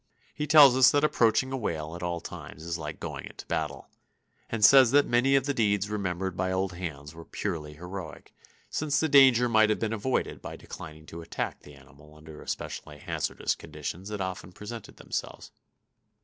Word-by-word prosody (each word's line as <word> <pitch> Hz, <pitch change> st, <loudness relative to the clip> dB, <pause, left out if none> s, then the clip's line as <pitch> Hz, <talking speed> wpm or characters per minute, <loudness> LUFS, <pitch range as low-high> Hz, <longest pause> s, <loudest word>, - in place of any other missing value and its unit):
He 150 Hz, -, -3 dB
tells 145 Hz, -4 st, +8 dB
us 130 Hz, -1 st, +7 dB
that 145 Hz, 0 st, +2 dB
approaching 130 Hz, -2 st, +2 dB
a 135 Hz, -, -2 dB
whale 80 Hz, -8 st, -3 dB
at 85 Hz, -, -8 dB
all 85 Hz, -1 st, -3 dB
times 80 Hz, -, -9 dB
is 85 Hz, +1 st, -4 dB
like 75 Hz, -1 st, -6 dB
going -, -, -6 dB
into -, -, -11 dB
battle, -, -, -3 dB, 0.6 s
and 110 Hz, -3 st, +3 dB
says 130 Hz, +2 st, +8 dB
that 145 Hz, +3 st, +5 dB
many 125 Hz, +3 st, +3 dB
of 135 Hz, -1 st, +2 dB
the 140 Hz, -, 0 dB
deeds 105 Hz, -4 st, +1 dB
remembered 95 Hz, -3 st, -2 dB
by 95 Hz, 0 st, -1 dB
old 95 Hz, 0 st, -1 dB
hands 75 Hz, -4 st, -7 dB
were 85 Hz, 0 st, -10 dB
purely 75 Hz, -2 st, -4 dB
heroic, 90 Hz, -1 st, -8 dB, 0.3 s
since 150 Hz, -1 st, 0 dB
the 160 Hz, -, +2 dB
danger 135 Hz, -4 st, +6 dB
might 110 Hz, -2 st, +4 dB
have 110 Hz, -, +2 dB
been 110 Hz, -1 st, -2 dB
avoided 115 Hz, +4 st, -2 dB
by -, -, -7 dB
declining 80 Hz, 0 st, -10 dB
to 85 Hz, +1 st, -9 dB
attack 80 Hz, -, -4 dB
the 75 Hz, -, -15 dB
animal 70 Hz, +3 st, -18 dB
under 75 Hz, 0 st, -12 dB
the -, -, -11 dB
especially 75 Hz, -1 st, -6 dB
hazardous -, -, -2 dB
conditions 80 Hz, +5 st, -7 dB
that 105 Hz, -2 st, -4 dB
often 95 Hz, 0 st, -5 dB
present 105 Hz, +4 st, -9 dB
themselves. -, -, -5 dB
95 Hz, 190 wpm, -28 LUFS, 80-125 Hz, 0.6 s, tells